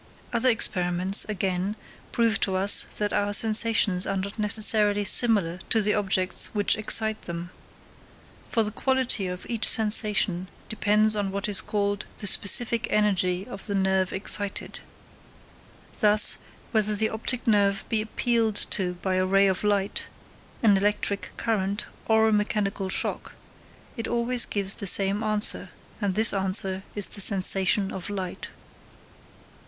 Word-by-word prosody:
Other 240 +2 +2
experiments, 185 -4 +2
again, 190 0 -3 0.4
prove 230 -3 0
to 190 - -1
us 195 +2 +5
that 205 -1 -3
our 205 0 -1
sensations 215 -3 +3
are 195 - -2
not 200 +3 -6
necessarily 210 -1 +2
similar 200 -7 +3
to 225 - +2
the 210 0 0
objects 190 -2 -1
which 205 -1 +1
excite 220 0 0
them; 170 +1 -7 1.0
for 225 - 0
the 210 - -4
quality 260 -4 0
of 180 0 -7
each 230 -2 0
sensation 210 -4 +1 0.2
depends 215 0 +1
on 205 -2 -2
what 200 +1 -3
is 205 -2 -1
called 205 -1 -3
the - - -8
specific 225 +4 +3
energy 190 -3 0
of 195 - -9
the 200 - -3
nerve 190 -1 0
excited. 200 0 -3 1.2
Thus, 210 0 +6 0.3
whether 215 -2 0
the 220 +1 -1
optic 230 +3 -2
nerve 200 -3 +1
be 220 -2 -1
appealed 225 0 -1 0.2
to 180 -3 -1
by 185 -1 -1
a 185 - +1
ray 195 +1 +3
of 190 0 -1
light, 205 -1 -2 0.6
an 205 -3 +4
electric 205 0 -2
current, 205 -2 -2 0.2
or 220 0 +3
a 220 - +1
mechanical 205 -2 -2
shock, - - -4 0.6
it 230 -3 -5
always 235 +1 +1
gives 195 -1 -2
the 200 - -7
same 195 +2 +3
answer, 215 0 0 0.3
and 200 -3 -2
this 220 +1 +3
answer 190 -1 +1
is 205 -2 +2
the 200 - -3
sensation 195 +1 +2
of 190 +1 -7
light. 190 -3 -6
205 Hz, 145 wpm, -24 LUFS, 190-215 Hz, 1.2 s, Thus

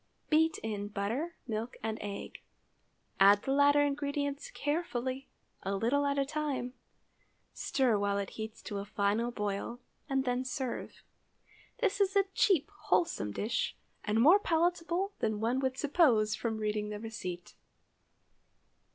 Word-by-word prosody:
Beat 320 +1 +4
in 205 -2 -3
butter, 225 +12 -2
milk 225 0 -4
and 220 0 -2
egg. 200 -1 -6 0.8
Add 200 +1 +7
the 270 - -1
latter 285 +1 +5
ingredients 285 0 -2
carefully, 270 -4 -2 0.3
a 195 +1 -2
little 270 +8 +2
at 280 0 0
a 275 - +2
time; 285 -4 -2 0.8
stir 245 -6 +1
while 200 0 +1
it 200 -1 -3
heats 220 0 -7
to 205 -3 -4
a - - -3
final 210 +3 0
boil, 210 +1 -3 0.3
and 270 -1 +1
then 250 0 0
serve. 255 -1 -4 0.8
This 405 -3 +1
is 395 0 +2
a 395 - +6
cheap 385 0 +3
wholesome 105 - +1
dish, 215 - -1 0.3
and 215 +1 +1
more 325 - +7
palatable 350 +2 +1
than 215 -1 0
one 235 +4 +1
would 260 -1 -1
suppose 270 -9 +3
from 220 0 -2
reading 210 -1 -1
the 210 0 -5
receipt. 195 -6 -6
250 Hz, 140 wpm, -32 LUFS, 210-290 Hz, 0.8 s, Add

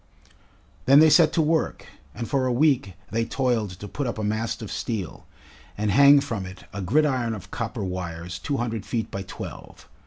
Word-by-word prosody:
Then 135 +2 +7
they 155 +1 +7
set 160 0 +6
to 165 -1 +3
work, 160 +1 0 0.3
and 115 - -4
for 135 -2 +1
a - - +1
week 130 -6 +2 0.2
they 115 +1 +1
toiled 120 -4 0
to 105 - -7
put 140 +5 -3
up 120 - -3
a 110 - -3
mast 110 +2 -2
of 105 - -7
steel, 105 -8 -4 0.5
and 105 0 0
hang 140 +4 +7
from 115 -8 -4
it 95 0 -11
a 100 - -4
gridiron 125 - +1
of 100 -1 -11
copper 115 -1 -4
wires 90 -2 -5
two 140 -1 -2
hundred 115 -4 -3
feet 115 0 -3
by 100 - -4
twelve. 95 - -9
115 Hz, 190 wpm, -25 LUFS, 100-140 Hz, 0.5 s, Then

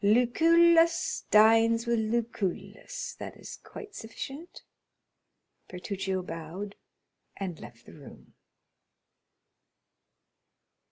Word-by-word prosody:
'Lucullus 330 +10 +4
dines 225 +2 +5
with 235 -1 +1
Lucullus,' 235 - -3
that - - -8
is - - -9
quite 415 -1 -10
sufficient." 275 - -8 1.1
Bertuccio 190 +1 -3
bowed, 170 +5 -7 0.6
and 185 -4 -5
left 120 0 -13
the - - -14
room. 145 -5 -15
225 Hz, 75 wpm, -28 LUFS, 190-290 Hz, 1.1 s, dines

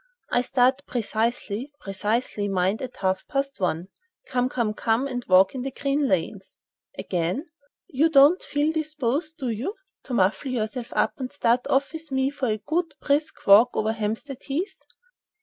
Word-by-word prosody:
I 245 - +3
start 255 +2 +2
precisely—precisely, 220 -1 -2
mind—at 195 +6 -1
half 190 -1 -1
past 275 0 -2
one. 180 -1 -1 0.4
Come, 250 -1 0
come, 235 -4 -1
come 225 +4 +1
and 245 -2 -4
walk 185 +1 +6
in 260 - -4
the 270 - -2
green 280 +1 0
lanes!" 190 0 -2 0.4
Again: 180 - -2 0.4
"You 300 +5 +2
don't 300 +4 +6
feel 290 +2 0
disposed, 310 0 -2
do 265 -5 -3
you, 245 - -3 0.3
to 250 - -3
muffle 200 +7 +1
yourself 235 0 -3
up - - +2
and 255 -1 -4
start 240 +2 +1
off 275 +3 +1
with 320 -2 -7
me 265 +1 +1
for 280 -3 -2
a 215 -1 0
good, 325 +11 -2
brisk 295 +2 -1
walk 215 +5 +7
over 215 +1 +1
Hampstead 225 +5 -4
Heath?" 315 +9 -3
250 Hz, 155 wpm, -25 LUFS, 215-280 Hz, 0.4 s, walk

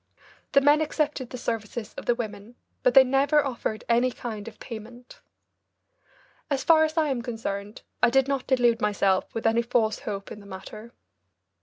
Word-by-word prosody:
The 275 - +6
men 290 +2 +5
accepted 295 -4 -1
the 250 - -6
services 225 -2 -4
of - - -9
the 240 - +3
women, 215 -1 -7 0.3
but 250 - +2
they 270 - +10
never 275 +3 +2
offered 235 -4 -3
any 240 +2 +3
kind 220 -4 -7
of 220 - -10
payment. 235 +2 -10 1.3
As 275 -2 -1
far 320 -1 +6
as 310 +1 -2
I 310 -2 +2
am 260 -3 -1
concerned, 210 -4 -5 0.2
I - - +6
did 270 +2 +3
not 275 -2 -2
delude 240 -3 +3
myself 200 -2 +1
with 225 - -4
any 225 +1 +3
false 235 -2 0
hopes 200 -2 -6
in - - -8
the 200 - -14
matter. 210 +4 -10
235 Hz, 175 wpm, -26 LUFS, 215-270 Hz, 1.3 s, they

